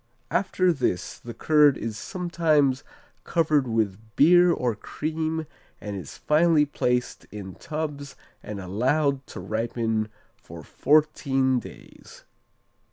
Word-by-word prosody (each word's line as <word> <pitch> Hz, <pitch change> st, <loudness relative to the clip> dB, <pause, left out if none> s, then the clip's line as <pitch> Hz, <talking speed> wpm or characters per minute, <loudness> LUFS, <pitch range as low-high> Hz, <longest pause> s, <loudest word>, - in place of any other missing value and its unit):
After 185 Hz, -1 st, +2 dB
this 95 Hz, -, -2 dB
the 120 Hz, -1 st, -9 dB
curd 150 Hz, +1 st, +4 dB
is 110 Hz, -1 st, -4 dB
sometimes 155 Hz, -, 0 dB, 0.4 s
covered 150 Hz, -5 st, +1 dB
with 110 Hz, -4 st, 0 dB, 0.2 s
beer 175 Hz, +4 st, +6 dB
or 125 Hz, -7 st, 0 dB
cream 160 Hz, +7 st, -3 dB, 0.3 s
and 105 Hz, -1 st, -6 dB
is 90 Hz, -8 st, -8 dB
finally 155 Hz, 0 st, +3 dB
placed 125 Hz, -3 st, -1 dB
in 100 Hz, -3 st, -8 dB
tubs 150 Hz, -, -5 dB, 0.3 s
and 105 Hz, -1 st, -7 dB
allowed 130 Hz, +9 st, 0 dB
to -, -, -8 dB
ripen 110 Hz, +2 st, -2 dB, 0.3 s
for -, -, -12 dB
fourteen 135 Hz, -3 st, +2 dB
days. -, -, -14 dB
140 Hz, 110 wpm, -25 LUFS, 115-155 Hz, 0.4 s, beer